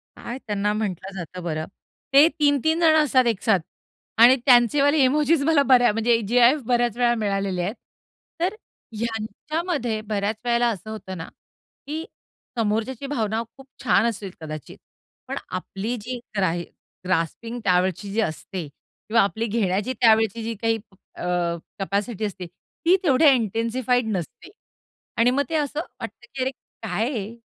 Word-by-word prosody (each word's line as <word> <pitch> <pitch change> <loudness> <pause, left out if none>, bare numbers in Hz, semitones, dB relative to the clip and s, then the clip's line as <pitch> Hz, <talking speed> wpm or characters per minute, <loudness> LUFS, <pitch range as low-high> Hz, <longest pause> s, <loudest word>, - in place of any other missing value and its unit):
काय 240 - -6
त्यांना 205 0 0
म्हंटलं 195 -3 -3
जातं 180 +1 -7
बरं 155 -2 -2 0.5
ते 285 +3 +8
3-3 295 +2 +2
जणं 315 -2 +5
असतात 260 -3 +3
एकसाथ 220 -2 +2 0.6
आणि 245 +3 +9
त्यांचेवाले 275 +4 +5
इमोजीस 300 +3 +3
मला 315 -3 +4
बऱ्या 245 -2 +6
म्हणजे 225 +1 +2
जी-आय-एफ 245 +5 +5
बऱ्याच 240 -1 +1
वेळा 240 -1 +3
मिळालेले 195 -4 -1
आहेत. 195 +4 -2 0.7
तर 360 +4 +1 0.4
ह्यांच्यामध्ये 235 - -2
बऱ्याच 210 0 -2
वेळेला 240 0 +3
असं 215 -1 -5
होतं 200 -4 -7
ना, 165 - -6 0.6
की 315 +3 -4 0.5
समोरच्याची 225 +4 -1
भावना 225 -5 -1 0.2
खूप 270 0 -14 0.2
छान - - +4
असतील 200 -4 -6
कदाचित, 155 -2 -8 0.5
पण - - -4
आपली 195 +5 -4
जी 245 +4 -5 0.2
ग्रा 185 -4 +2 0.5
ग्रास्पिंग 185 +7 -1
त्यावेळची 185 +1 +1
जी 220 +3 +1
असते 170 -1 -4
किंवा 215 +10 -2
आपली 220 +3 0
घेण्याची 205 +1 0
त्यावेळची 225 -1 +4
जी 230 +1 -3
काही 225 -1 +2 0.4
अ, - - -7 0.6
कॅपॅसिटी 200 +2 -2
असते, 190 -3 -5
ती 330 - -1
तेवढ्या 300 -1 +5
इंटेन्सिफाईड 235 +1 0
नसते 190 - -6 0.7
आणि 235 +2 +4
मग 280 +2 +1
ते 325 - -2
असं 295 -1 -1
वाटतं 240 - -8
की 265 - -3
अरे, 260 - +1 0.3
काय 220 +4 -1
हे 220 -3 -4
225 Hz, 140 wpm, -24 LUFS, 200-255 Hz, 0.7 s, आणि